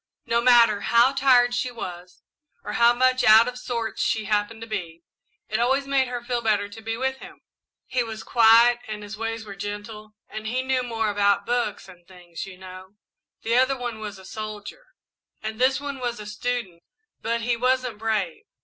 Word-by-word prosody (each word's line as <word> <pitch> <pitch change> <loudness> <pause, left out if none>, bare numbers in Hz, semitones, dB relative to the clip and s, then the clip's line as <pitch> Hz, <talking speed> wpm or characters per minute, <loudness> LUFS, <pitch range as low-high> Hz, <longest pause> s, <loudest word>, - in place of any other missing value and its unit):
No 235 0 +1
matter 235 -4 +5
how 235 +5 +4
tired 255 -3 +4
she 245 +1 -1
was, 180 -6 -9 0.4
or - - -5
how 235 0 +5
much 255 +1 +2
out 220 +2 +7
of 250 0 -5
sorts 230 -3 -3
she 220 -1 0
happened 210 +2 -1
to 225 - -7
be, 170 -6 -6 0.4
it 220 - -2
always 265 +4 +1
made 275 -1 +1
her 245 -1 -5
feel 240 0 -2
better 210 -3 +1
to 215 +2 -12
be 225 +1 -4
with 265 +1 -1
him. - - -13 0.4
He 255 - -1
was 225 -2 -5
quiet 235 +1 +5
and 210 -1 -6
his 205 +1 -7
ways 225 0 -4
were 200 -2 -9
gentle, 210 +1 -7
and 215 0 -7
he 255 +3 -1
knew 260 -1 0
more 225 -3 -2
about 200 0 +2
about - - -26
books 240 -5 -2
and 175 -2 -16
things, 180 -1 -9
you 185 -2 -11
know. 185 +1 -12 0.5
The 230 +1 +1
other 260 +1 +3
one 240 -3 -5
was 210 -2 -7
a 190 - -14
soldier, 215 - -8 0.6
and 220 +2 -5
this 260 +1 +3
one 285 -1 -6
was 240 -2 -3
a 210 - -8
student, 210 -4 -4 0.4
but 230 +1 -1
he 230 - -4
he 240 - +2
wasn't 250 -2 0
brave. 215 -6 -2
225 Hz, 200 wpm, -24 LUFS, 205-245 Hz, 0.6 s, out